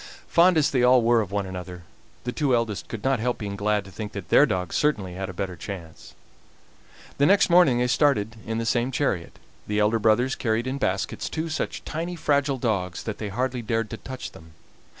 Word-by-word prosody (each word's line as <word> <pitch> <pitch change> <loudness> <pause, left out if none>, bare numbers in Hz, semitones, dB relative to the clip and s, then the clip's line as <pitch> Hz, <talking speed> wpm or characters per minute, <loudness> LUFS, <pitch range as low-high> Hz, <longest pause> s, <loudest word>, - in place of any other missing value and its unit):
Fond 175 0 +5
as 155 0 +3
they 130 -4 +2
all 125 0 +5
were 115 0 +4
of 100 -3 -5
one 100 -1 -1
another, 90 -1 -7 0.4
the 125 - -2
two 135 -1 +1
eldest 110 -6 -2
could 110 -3 -7
not 135 -2 +2
help 125 +2 -1
being 100 -2 -5
glad 105 0 0
to 95 - -12
think 105 +2 -7
that 95 -5 -7
their 150 - +6
dogs 90 -6 -2
certainly 105 -12 0
had 95 +1 -5
a - - -4
better 95 0 -4
chance. 85 -2 -9 1.0
The 145 - +5
next 200 -2 +4
morning 170 -8 +6
they 125 - +2
started 125 -5 +2
in 110 0 -2
the 115 - -2
same 120 +2 +1
chariot. 110 -11 -2 0.3
The 105 - -1
elder 105 +2 +2
brothers 115 +5 +3
carried 115 -1 -1
in 130 +2 -3
baskets 95 -5 -2
two 160 +1 -3
such 155 - -3
tiny, 170 +3 -4
fragile 145 -3 +1
dogs 100 -7 -2
that 110 - -5
they 105 - -4
hardly 125 +4 -2
dared 115 -1 -2
to 115 - -5
touch 130 +2 -7
them. 80 0 -16
115 Hz, 210 wpm, -25 LUFS, 100-130 Hz, 1.0 s, their